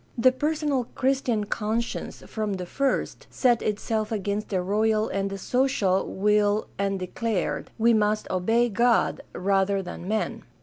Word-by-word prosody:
The 255 Hz, +2 st, +5 dB
personal 295 Hz, -2 st, 0 dB
Christian 260 Hz, -5 st, +1 dB
conscience 220 Hz, +3 st, -3 dB
from 215 Hz, -2 st, -3 dB
the 185 Hz, -1 st, -4 dB
first 275 Hz, +9 st, -1 dB
set 245 Hz, -3 st, +2 dB
itself 215 Hz, +1 st, -1 dB
against 205 Hz, 0 st, -2 dB
the 190 Hz, -, 0 dB
royal 215 Hz, +3 st, +1 dB
and 195 Hz, 0 st, -1 dB
the 195 Hz, -, -5 dB
social 205 Hz, -4 st, +1 dB
will 210 Hz, +1 st, +2 dB
and 195 Hz, 0 st, 0 dB
declared, 190 Hz, +2 st, -2 dB
"We 230 Hz, +1 st, +4 dB
must 215 Hz, 0 st, +1 dB
obey 225 Hz, +6 st, +2 dB
God 235 Hz, +2 st, +2 dB
rather 195 Hz, +1 st, +1 dB
than 180 Hz, 0 st, -7 dB
men." 215 Hz, +1 st, -1 dB
215 Hz, 140 wpm, -26 LUFS, 195-235 Hz, -, The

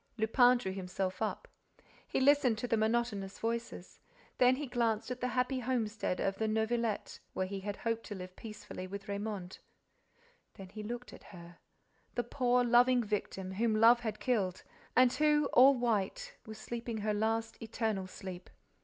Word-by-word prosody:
Lupin 245 Hz, +3 st, +5 dB
drew 190 Hz, -6 st, -4 dB
himself 185 Hz, 0 st, -4 dB
up. -, -, -2 dB, 0.6 s
He -, -, -1 dB
listened 270 Hz, -4 st, +4 dB
to 245 Hz, -, -3 dB
the 230 Hz, -, +2 dB
monotonous 220 Hz, -3 st, -1 dB
voices. 230 Hz, -5 st, -4 dB, 0.4 s
Then 250 Hz, 0 st, +6 dB
he 295 Hz, +3 st, -4 dB
glanced 235 Hz, -3 st, -1 dB
at 250 Hz, -, -5 dB
the 250 Hz, -, +1 dB
happy 255 Hz, +1 st, 0 dB
homestead 220 Hz, -6 st, -1 dB
of 195 Hz, 0 st, -1 dB
the 220 Hz, -, +1 dB
Neuvillette, 220 Hz, 0 st, -1 dB
where 185 Hz, -, -1 dB
he 195 Hz, +1 st, -5 dB
had 205 Hz, +1 st, -4 dB
hoped 230 Hz, +1 st, -2 dB
to 205 Hz, -, -6 dB
live 185 Hz, -1 st, -8 dB
peacefully 215 Hz, -4 st, -8 dB
with 195 Hz, +1 st, -7 dB
Raymonde. 200 Hz, -2 st, -4 dB, 1.0 s
Then 190 Hz, -1 st, -10 dB
he 215 Hz, +3 st, -8 dB
looked 240 Hz, +3 st, -6 dB
at -, -, -13 dB
her, 170 Hz, -2 st, -13 dB, 0.6 s
the 240 Hz, -, 0 dB
poor, 245 Hz, 0 st, +2 dB
loving 245 Hz, +1 st, +4 dB
victim, 195 Hz, -3 st, -3 dB
whom 220 Hz, +3 st, +1 dB
love 230 Hz, +2 st, +6 dB
had 220 Hz, -3 st, -4 dB
killed 195 Hz, -8 st, 0 dB, 0.3 s
and 250 Hz, 0 st, +5 dB
who, 300 Hz, +1 st, +3 dB
all 265 Hz, +2 st, +7 dB
white, 220 Hz, -5 st, -1 dB
was 220 Hz, 0 st, -8 dB
sleeping 235 Hz, -1 st, -5 dB
her 210 Hz, 0 st, 0 dB
last, 225 Hz, +2 st, -1 dB
eternal 220 Hz, -4 st, -2 dB
sleep. 185 Hz, -1 st, -9 dB
220 Hz, 165 wpm, -33 LUFS, 200-245 Hz, 1.0 s, all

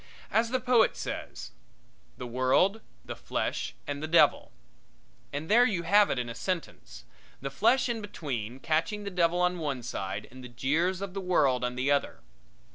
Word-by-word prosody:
As 225 Hz, +2 st, +2 dB
the 255 Hz, +1 st, 0 dB
poet 250 Hz, -3 st, +3 dB
says -, -, -6 dB, 0.7 s
"The -, -, -6 dB
world, 130 Hz, -, +2 dB, 0.2 s
the -, -, -6 dB
flesh -, -, -3 dB
and 145 Hz, 0 st, -4 dB
the 155 Hz, -, -3 dB
devil" 165 Hz, +2 st, +4 dB, 0.8 s
and 145 Hz, +3 st, -4 dB
there 235 Hz, +5 st, +6 dB
you 200 Hz, -8 st, 0 dB
have 205 Hz, +4 st, +5 dB
it -, -, -1 dB
in 125 Hz, -1 st, -2 dB
a 115 Hz, -, -5 dB
sentence 115 Hz, -, -5 dB, 0.3 s
the 135 Hz, +1 st, -5 dB
flesh 235 Hz, -, +3 dB
in 235 Hz, -2 st, -2 dB
between, 130 Hz, -, -5 dB
catching 170 Hz, +7 st, 0 dB
the 200 Hz, -, -5 dB
devil 175 Hz, -1 st, +2 dB
on 180 Hz, 0 st, +1 dB
one 140 Hz, -6 st, -3 dB
side 95 Hz, -5 st, -4 dB
and 130 Hz, +1 st, -12 dB
the 125 Hz, -, -9 dB
jeers 155 Hz, +10 st, 0 dB
of 200 Hz, -2 st, -5 dB
the 195 Hz, -, -4 dB
world 140 Hz, -9 st, +2 dB
on 125 Hz, 0 st, -2 dB
the 130 Hz, +3 st, 0 dB
other. 140 Hz, -, 0 dB
160 Hz, 180 wpm, -29 LUFS, 130-200 Hz, 0.8 s, there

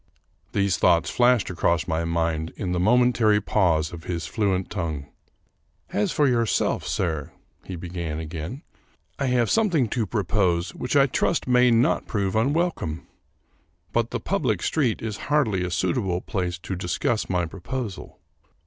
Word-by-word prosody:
These 100 Hz, -4 st, +1 dB
thoughts 85 Hz, -2 st, +3 dB
flashed 120 Hz, -5 st, +3 dB
across 85 Hz, -2 st, +1 dB
my 80 Hz, 0 st, -1 dB
mind 80 Hz, -1 st, -1 dB
in 95 Hz, -4 st, -3 dB
the 90 Hz, -, 0 dB
momentary 115 Hz, 0 st, +4 dB
pause 85 Hz, -6 st, +1 dB
of 85 Hz, -1 st, -9 dB
his. 85 Hz, -2 st, -3 dB
fluent 95 Hz, -4 st, -1 dB
tongue. 80 Hz, -5 st, -3 dB, 0.5 s
" -, -, -30 dB
As -, -, +1 dB
for 145 Hz, -, +3 dB
yourself, 115 Hz, -3 st, +1 dB
sir," 80 Hz, -6 st, -2 dB, 0.3 s
he 95 Hz, -, -6 dB
began 85 Hz, -2 st, -5 dB
again, 80 Hz, -, -6 dB, 0.3 s
" -, -, -39 dB
I 140 Hz, -, 0 dB
have 125 Hz, -2 st, +2 dB
some 225 Hz, -2 st, +3 dB
thing 150 Hz, -9 st, +2 dB
to 115 Hz, -2 st, -1 dB
propose 90 Hz, -3 st, 0 dB
which 125 Hz, +2 st, -3 dB
I 140 Hz, -1 st, +6 dB
trust 130 Hz, -, 0 dB
may 125 Hz, 0 st, +5 dB
not 115 Hz, +1 st, +2 dB
prove 100 Hz, -3 st, -1 dB
unwelcome. 135 Hz, -, 0 dB, 0.9 s
But 120 Hz, 0 st, +1 dB
the -, -, -3 dB
public -, -, -1 dB
street 130 Hz, -10 st, 0 dB
is 110 Hz, -2 st, -3 dB
hardly 115 Hz, -11 st, +2 dB
a 90 Hz, -, -2 dB
suitable 90 Hz, -1 st, 0 dB
place 90 Hz, -4 st, -3 dB
to 95 Hz, +2 st, -5 dB
discuss 90 Hz, +6 st, -1 dB
my 90 Hz, -2 st, +1 dB
proposal. 100 Hz, +5 st, -6 dB
95 Hz, 160 wpm, -24 LUFS, 85-120 Hz, 0.9 s, I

